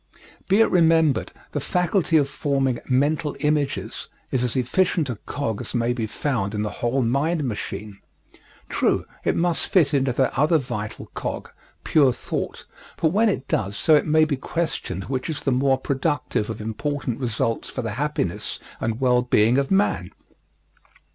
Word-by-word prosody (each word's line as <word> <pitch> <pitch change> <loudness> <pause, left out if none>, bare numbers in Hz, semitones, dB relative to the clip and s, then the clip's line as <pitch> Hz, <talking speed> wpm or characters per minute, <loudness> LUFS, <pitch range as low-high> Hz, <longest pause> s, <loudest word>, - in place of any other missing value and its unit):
Be 195 +3 +4
it - - +4
remembered, 160 - +3 0.2
the - - -2
faculty 180 -2 +2
of 145 -2 +3
forming 135 -3 0
mental 145 +3 +1
images 150 -2 -1 0.2
is 125 -2 +1
as 125 - -1
efficient 140 +3 +1
a 115 - -5
cog 115 -8 -2
as - - -5
may 120 0 +1
be 115 -3 -2
found 110 -5 -2
in 105 - -1
the 105 - -2
whole 125 +3 +1
mind 145 +7 +1
machine. 105 -4 -5 0.7
True, - - +1 0.2
it - - +1
must 170 -1 +1
fit 160 -6 +3
into 135 -2 +2
that 130 +1 +1
other 155 +3 +4
vital 120 -6 -5
cog, - - -4 0.3
pure 140 -4 +4
thought, - - -4 0.3
but 160 - +2
when 215 +6 +3
it 185 - -2
does 100 0 -1
so 160 - +3
it 150 - +4
may 155 +1 +5
be 145 -3 -1
questioned 135 - -3
which 130 - -3
is 155 - -3
the 135 - +1
more 135 +1 +3
productive 135 -6 -1
of 110 - -5
important 135 +3 -3
results 115 -2 -1
for 130 - -4
the 115 - -2
happiness 135 - -2 0.2
and 115 +1 -2
well 125 -1 +4
being 120 0 +3
of 140 - -1
man. 195 +1 +1
135 Hz, 165 wpm, -23 LUFS, 120-155 Hz, 0.7 s, may